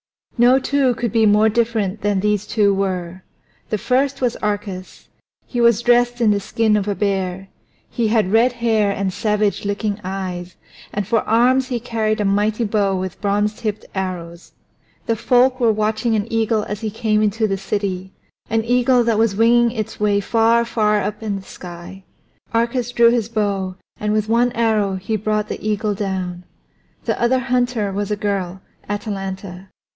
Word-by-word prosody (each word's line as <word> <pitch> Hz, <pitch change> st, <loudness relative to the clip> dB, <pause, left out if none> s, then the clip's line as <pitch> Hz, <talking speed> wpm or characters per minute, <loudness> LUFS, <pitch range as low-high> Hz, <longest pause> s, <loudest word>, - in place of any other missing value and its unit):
No 245 Hz, +2 st, +5 dB
two 270 Hz, -2 st, +1 dB
could 235 Hz, -2 st, -2 dB
be 220 Hz, 0 st, +3 dB
more 210 Hz, +1 st, +5 dB
different 220 Hz, -3 st, 0 dB
than 205 Hz, -2 st, +1 dB
these 210 Hz, -1 st, 0 dB
two 205 Hz, -3 st, +2 dB
were. 185 Hz, -2 st, -3 dB, 0.5 s
The 215 Hz, -, 0 dB
first 260 Hz, +5 st, 0 dB
was 245 Hz, -2 st, +1 dB
Arcas. 205 Hz, -3 st, -4 dB, 0.4 s
He 245 Hz, -, -2 dB
was 235 Hz, -1 st, +4 dB
dressed 245 Hz, 0 st, +3 dB
in 225 Hz, -3 st, +4 dB
the 205 Hz, -, +1 dB
skin 215 Hz, +2 st, +1 dB
of 205 Hz, -1 st, 0 dB
a 205 Hz, -, 0 dB
bear; 195 Hz, -1 st, -2 dB, 0.4 s
he 235 Hz, -2 st, -1 dB
had 215 Hz, -4 st, +1 dB
red 235 Hz, +3 st, +4 dB
hair 225 Hz, -4 st, +1 dB
and 195 Hz, -1 st, -2 dB
savage 210 Hz, 0 st, 0 dB
looking 205 Hz, 0 st, -2 dB
eyes, 185 Hz, -2 st, -5 dB, 0.4 s
and 205 Hz, -1 st, -2 dB
for 230 Hz, 0 st, +2 dB
arms 250 Hz, +4 st, +3 dB
he 245 Hz, -3 st, -2 dB
carried 220 Hz, -2 st, -1 dB
a 210 Hz, -, 0 dB
mighty 210 Hz, +3 st, +1 dB
bow 205 Hz, -3 st, +1 dB
with 185 Hz, -1 st, -6 dB
bronze 205 Hz, +1 st, +1 dB
tipped 215 Hz, -1 st, -4 dB
arrows. 175 Hz, -3 st, -5 dB, 0.5 s
The 230 Hz, -, +1 dB
folk 250 Hz, +3 st, +3 dB
were 235 Hz, -3 st, +4 dB
watching 215 Hz, +2 st, 0 dB
an 205 Hz, -1 st, 0 dB
eagle 225 Hz, -1 st, +1 dB
as 210 Hz, +1 st, -5 dB
he 220 Hz, -, -2 dB
came 215 Hz, 0 st, 0 dB
into 215 Hz, +1 st, +1 dB
the 195 Hz, -1 st, -1 dB
city, 190 Hz, -2 st, -3 dB, 0.4 s
an 225 Hz, 0 st, +1 dB
eagle 245 Hz, +1 st, +3 dB
that 230 Hz, -2 st, +1 dB
was 225 Hz, -3 st, +2 dB
winging 235 Hz, +2 st, +4 dB
its 220 Hz, -3 st, -5 dB
way 205 Hz, -1 st, +2 dB
far, 230 Hz, +2 st, +2 dB
far 210 Hz, -2 st, +1 dB
up 205 Hz, +2 st, -4 dB
in 210 Hz, -2 st, -2 dB
the 195 Hz, -, -6 dB
sky. 180 Hz, +2 st, -10 dB, 0.5 s
Arcas 235 Hz, +1 st, 0 dB
drew 235 Hz, -1 st, +5 dB
his 230 Hz, -2 st, 0 dB
bow, 200 Hz, -4 st, -1 dB, 0.2 s
and 210 Hz, 0 st, -1 dB
with 215 Hz, 0 st, 0 dB
one 235 Hz, +2 st, +2 dB
arrow 220 Hz, -4 st, +1 dB
he 195 Hz, +4 st, -3 dB
brought 215 Hz, 0 st, -1 dB
the -, -, -6 dB
eagle 210 Hz, 0 st, 0 dB
down. 185 Hz, -3 st, -3 dB, 0.6 s
The -, -, -1 dB
other 240 Hz, +2 st, +3 dB
hunter 245 Hz, -5 st, 0 dB
was 205 Hz, +1 st, -2 dB
a 210 Hz, -, 0 dB
girl, 195 Hz, -3 st, -3 dB, 0.3 s
Atalanta. 195 Hz, -3 st, -5 dB
210 Hz, 175 wpm, -20 LUFS, 195-230 Hz, 0.6 s, No